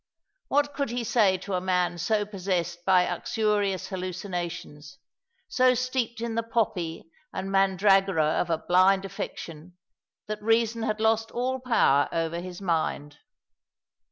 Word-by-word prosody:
What 285 +1 +1
could 280 -2 -2
he 240 0 -2
say 210 -4 +3
to 195 +2 -6
a 180 - 0
man 180 -2 0
so 210 +4 +1
possessed 180 -4 -3
by 185 -2 +5
uxorious 205 +1 -1
hallucinations, 175 -5 -5 0.5
so 255 0 +3
steeped 250 -2 -2
in 235 -1 -3
the 230 - 0
poppy 180 -8 -2 0.2
and 190 +1 -4
mandragora 195 -3 +3 0.2
of 175 - -3
a 165 - +1
blind 185 +3 +3
affection, 175 -3 -7 0.5
that 215 0 -5
reason 225 +1 +1
had 215 -1 -1
lost 225 0 +2
all 255 +2 -2
power 230 - +3
over 165 0 -1
his 180 0 -8
mind. 155 -4 -2
195 Hz, 135 wpm, -26 LUFS, 175-225 Hz, 0.5 s, by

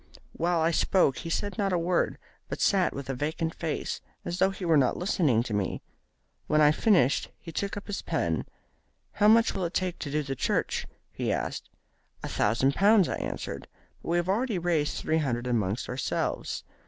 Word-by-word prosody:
While 170 0 +1
I 165 +1 +3
spoke 170 -4 +2
he 165 - -6
said 205 +5 -2
not 200 -1 +1
a 180 - +2
word, 170 +1 0 0.3
but - - -4
sat 190 -3 +3
with 140 -1 -7
a 135 - -2
vacant 160 +4 -2
face, 160 -2 -3 0.2
as 175 +1 -3
though 190 - +4
he 195 -1 -6
were 165 -2 +4
not 135 -4 +3
listening 155 - +2
to 120 - -5
me. 100 -2 -2 0.6
When 155 - +3
I 150 -1 +6
had - - -2
finished 175 - +3
he 165 - -9
took 200 +5 -3
up 205 - -7
his 205 - -4
pen. - - -1 0.7
'How 210 - +3
much 225 +1 +5
will 190 - -2
it 170 - -5
take 185 -2 -1
to 145 - -4
do 150 +1 0
the 135 -1 -4
church?' - - -1 0.2
he - - -2
asked. - - -3 0.5
'A - - -4
thousand 130 +5 +2
pounds,' 200 0 +5
I - - -2
answered; - - -5 0.3
'but - - -7
we 170 - +2
have 175 0 0
already 215 +2 0
raised 165 -4 0
three 160 +1 0
hundred 125 -5 -1
among 110 -5 0
ourselves. 125 +1 -2
165 Hz, 200 wpm, -28 LUFS, 140-190 Hz, 0.7 s, I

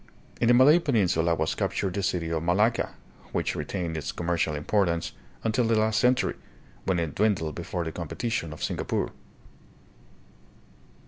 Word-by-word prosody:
In 120 - +3
the 120 - +6
Malay 145 +7 +7
peninsula 90 - +2
was 80 - 0
captured 95 -2 -1
the 100 - -1
city 90 -3 -1
of 80 -1 0
Malacca, 105 +8 +1 0.4
which - - -1
retained 85 -4 -3
its 80 -3 -3
commercial 85 -3 -1
importance 85 +2 0 0.3
until 115 +2 +1
the 115 0 +2
last 110 0 +2
century, 125 +3 +2 0.5
when 95 -2 +1
it 80 -4 -2
dwindled 95 -7 +1
before 85 0 -4
the 80 - -4
competition 85 +2 -3
of 75 - -7
Singapore. - - -1
90 Hz, 145 wpm, -27 LUFS, 85-110 Hz, 0.5 s, Malay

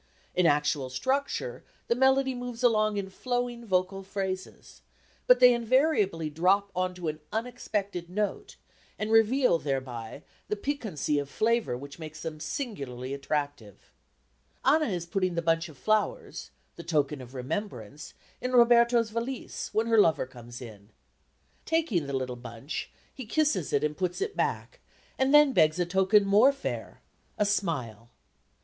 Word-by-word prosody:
In 180 -2 +3
actual 145 -2 +1
structure 280 - -2 0.2
the - - +3
melody 265 +1 +3
moves 245 -1 -6
along 215 -3 +3
in 195 -1 -4
flowing 245 +2 -3
vocal 190 -2 0
phrases, 190 -1 -6 0.5
but - - +7
they 250 0 +8
invariably 235 - +2
drop 185 +6 +2
on 185 0 -1
to 180 -2 -5
an 155 0 -3
unexpected 210 -6 -3
note 205 +2 -3 0.4
and 215 +1 -3
reveal 225 -3 +4
thereby 130 -6 -4 0.2
that 210 -1 -4
piquancy 215 - -1
of 140 -1 -5
flavour 225 - 0
which 140 +4 -10
makes 155 -1 -8
them 155 -1 -5
singularly 140 - -5
attractive. 140 -6 -4 0.7
Anna 305 +3 +4
is 175 -5 -3
putting 185 0 -1
the - - +1
bunch 165 0 +1
of 150 - -14
flowers, 425 - -1 0.3
the 170 - -8
token 150 -4 0
of 130 +1 -12
remembrance, 135 - -5 0.3
in 250 0 -3
Roberto's 235 -1 +5
valise 235 +3 -4
when 220 +2 +1
her 230 -1 +4
lover 160 -9 +4
comes 120 -1 -11
in. 105 -3 -12 0.7
Taking 280 - 0
the 140 - -5
little 130 -2 -2
bunch 120 +3 -6 0.2
he 260 -4 -8
kisses 260 - +1
it 145 - +1
and 150 0 0
puts 180 0 -2
it 410 +1 -3
back, - - -2 0.4
and 265 +1 +3
then 295 -2 +7
begs 155 -4 +4
a 175 - +1
token 190 +3 +3
more 210 +7 +6
fair 275 0 -6 0.4
a 210 - +2
smile. 130 - -2
190 Hz, 150 wpm, -28 LUFS, 150-235 Hz, 0.7 s, they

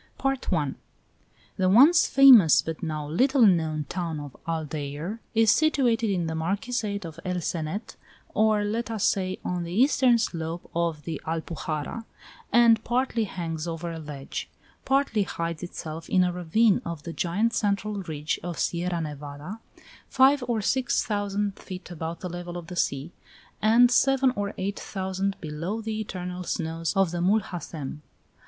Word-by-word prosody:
MOORS 270 0 +3
AND 270 - -8
CHRISTIANS 150 -7 0
I. - - -39 0.2
The 185 -1 +2
once 280 - +7
famous 250 - +8
but 160 -1 -5
now 155 -3 -3
little 255 - +4
known 160 -5 +2
town 170 -4 -3
of 145 -3 -9
Aldeire 155 +4 -4 0.2
is 225 -1 +5
situated 245 -8 +2
in 180 -4 0
the 160 - -3
Marquisate 200 +4 -2
of 165 -1 -9
El 180 -1 -2
Cenet, 170 +5 -4 0.4
or, 215 -1 +3
let 220 +3 -2
us 220 -3 -2
say, 185 -1 0
on 180 -1 -1
the 170 - -6
eastern 250 +3 +4
slope 165 -5 -4
of 165 -3 -1
the 165 - -5
Alpujarra, 160 +4 -4 0.5
and 230 -2 +5
partly 240 -2 0
hangs 165 -4 -4
over 170 +1 -4
a 165 - -6
ledge, 145 -3 -6 0.4
partly 270 -5 +2
hides 170 -4 -3
itself 165 -2 -7
in 185 - +4
a 180 -1 0
ravine 185 +5 +2
of 170 -3 -6
the 165 - -6
giant 205 +9 0
central 205 -1 -1
ridge 155 -4 -3
of 175 -1 -5
Sierra 175 0 -1
Nevada, 150 +6 -7 0.5
five 270 +1 +4
or 230 -3 0
six 255 +4 +1
thousand 205 -1 -2
feet 185 -1 -9
above 165 0 -5
the 180 - -4
level 175 0 -6
of 175 - -7
the 180 - -8
sea, 140 -1 -1 0.5
and 235 +3 +5
seven 270 0 +3
or 200 -1 -3
eight 195 +2 -3
thousand 190 0 -3
below 165 +7 -4
the 220 -1 -4
eternal 180 -3 -5
snows 165 -1 -2
of 195 -3 +3
the 175 - -3
Mulhacem. 175 -7 -2
180 Hz, 160 wpm, -26 LUFS, 165-220 Hz, 0.5 s, famous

